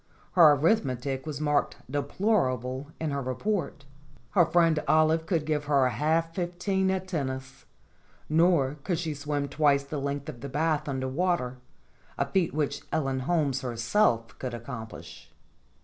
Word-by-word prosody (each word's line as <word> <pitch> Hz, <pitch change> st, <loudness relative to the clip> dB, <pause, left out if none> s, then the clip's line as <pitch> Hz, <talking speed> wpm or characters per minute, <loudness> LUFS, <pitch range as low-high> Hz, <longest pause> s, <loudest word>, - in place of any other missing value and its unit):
Her 160 Hz, -5 st, +7 dB
arithmetic 140 Hz, -, 0 dB
was 150 Hz, -2 st, -4 dB
marked 150 Hz, -1 st, +1 dB
"Deplorable" 140 Hz, -, 0 dB
in 160 Hz, -2 st, -2 dB
her 140 Hz, 0 st, -2 dB
report. 140 Hz, -, -2 dB, 0.5 s
Her 175 Hz, -5 st, +4 dB
friend 165 Hz, -3 st, +3 dB
Olive 155 Hz, +1 st, +3 dB
could 165 Hz, -4 st, 0 dB
give 150 Hz, -1 st, -1 dB
her 140 Hz, -3 st, +3 dB
half 160 Hz, +4 st, 0 dB
fif 175 Hz, 0 st, -3 dB
teen 190 Hz, +1 st, +1 dB
at 190 Hz, 0 st, -1 dB
tennis, 135 Hz, -5 st, -4 dB, 0.6 s
nor 155 Hz, -3 st, +3 dB
could 175 Hz, -, -1 dB
she 160 Hz, -2 st, -2 dB
swim 145 Hz, 0 st, -2 dB
twice 145 Hz, -1 st, +2 dB
the 140 Hz, +1 st, -5 dB
length 140 Hz, 0 st, -3 dB
of 130 Hz, -6 st, -8 dB
the 140 Hz, -, -5 dB
bath 150 Hz, +1 st, 0 dB
under 130 Hz, -1 st, -2 dB
water, 135 Hz, -4 st, 0 dB, 0.6 s
a -, -, +1 dB
feat 185 Hz, -3 st, +1 dB
which 150 Hz, -1 st, -1 dB
Ellen 135 Hz, -3 st, 0 dB
Holmes 140 Hz, -2 st, 0 dB
her 120 Hz, -3 st, -4 dB
self 115 Hz, -, +1 dB
could 125 Hz, -2 st, -4 dB
accomplish. 115 Hz, -1 st, -9 dB
145 Hz, 150 wpm, -28 LUFS, 135-165 Hz, 0.6 s, Her